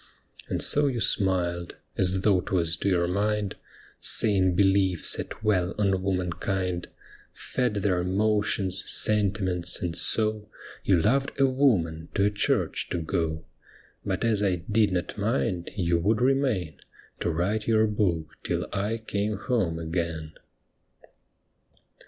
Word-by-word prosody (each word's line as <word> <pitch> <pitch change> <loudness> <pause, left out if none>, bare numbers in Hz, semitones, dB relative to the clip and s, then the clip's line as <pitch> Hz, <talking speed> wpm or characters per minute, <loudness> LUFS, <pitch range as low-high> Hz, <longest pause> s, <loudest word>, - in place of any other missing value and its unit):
And - - -1
so 145 0 +5
you 125 -4 -1
smiled, 90 -5 0 0.2
as 95 0 +1
though 95 -3 +3
'twas 85 -2 -1
to 100 - -1
your 85 -2 +2
mind, 105 +2 -1 0.4
Saying 95 -5 +3
belief 95 -2 +2
sat - - +1
well 95 -4 +1
on 95 -3 +1
womankind, 90 -1 -2 0.5
Fed 125 -4 -2
their 95 -3 +1
emotions, 100 0 0
sentiments, 95 -4 +1
and 85 -2 -3
so 110 -1 +2 0.3
You 95 -3 +3
loved 135 +9 0
a 135 - +5
woman 100 - +1
to 100 - +2
a 105 - +2
church 105 - -1
to - - -2
go. 80 -1 -2 0.6
But - - -2
as 110 -3 +1
I 95 -3 +2 0.2
did 105 -2 +3
not 90 -1 -3
mind, 85 +5 -1
you 85 -4 +1
would 105 +6 +1
remain 125 - 0 0.4
To - - -1
write 95 +6 -1
your 110 -1 +4
book 100 -7 0 0.2
till - - -2
I 105 +4 -1
came 105 -1 -3
home 100 -7 -1
again. 80 -1 -4
95 Hz, 135 wpm, -26 LUFS, 90-105 Hz, 0.6 s, so